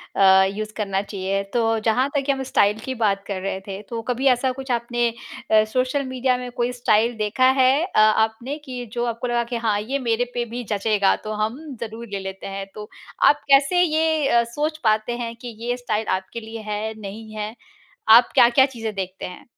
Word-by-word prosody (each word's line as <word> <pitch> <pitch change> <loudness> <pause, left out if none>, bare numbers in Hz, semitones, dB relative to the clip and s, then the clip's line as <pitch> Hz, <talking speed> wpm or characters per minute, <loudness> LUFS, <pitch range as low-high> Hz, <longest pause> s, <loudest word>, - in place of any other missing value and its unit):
अ, 190 -1 +6
use 215 +2 -5
करना 195 -2 -1
चाहिए। 195 -1 -3
तो 225 -2 +1
जहाँ 250 +4 +3
तक 280 0 -1
हम 270 -1 -2
स्टाइल 210 -4 +2
की 260 - -3
बात 200 -4 0
कर 195 -2 -4
रहे 190 0 -3
थे 195 0 -6
तो 230 -1 -4
कभी 255 +3 +1
ऐसा 260 +2 -1
कुछ 265 0 -6
आपने 240 0 0 0.4
अ, 215 0 +6
सोशल 255 +2 +1
मीडिया 255 -1 0
में 250 0 -6
कोई 240 0 -1
स्टाइल 235 -1 +2
देखा 220 +5 +2
है 265 +4 +4
अ, 360 - 0
आपने 220 +5 +2
कि 250 -3 -6
जो 240 0 -1
आपको 235 +1 -3
लगा 240 0 +1
कि 235 +1 -5
हाँ 205 -1 +2
ये 270 +6 -2
मेरे 240 -1 0
पे 240 -1 -1
भी 240 +2 -6
जचेगा 200 -1 +2
तो 215 - -4
हम 225 +6 -3 0.2
ज़रूर 230 +1 -6
ले 200 - -3
लेते 190 0 -7
हैं। 195 0 -5
तो 210 0 -8 0.3
आप 295 0 +5
कैसे 280 +6 +5
ये 315 -2 +1
अ, 235 -3 +4
सोच 295 +7 -3
पाते 215 +2 +1
हैं 235 -1 -5
कि 240 -3 -8
ये 245 0 0
स्टाइल 220 -3 -2
आपके 190 +5 -8
लिए 225 0 -8
है 215 +1 -3
नहीं 215 +2 -8
है? 215 +1 -5 0.5
आप 235 +2 +8
क्या-क्या 240 +3 +6
चीज़ें 225 -5 -6
देखते 190 -1 -5
हैं? 180 - -10
235 Hz, 205 wpm, -22 LUFS, 210-255 Hz, 0.5 s, आप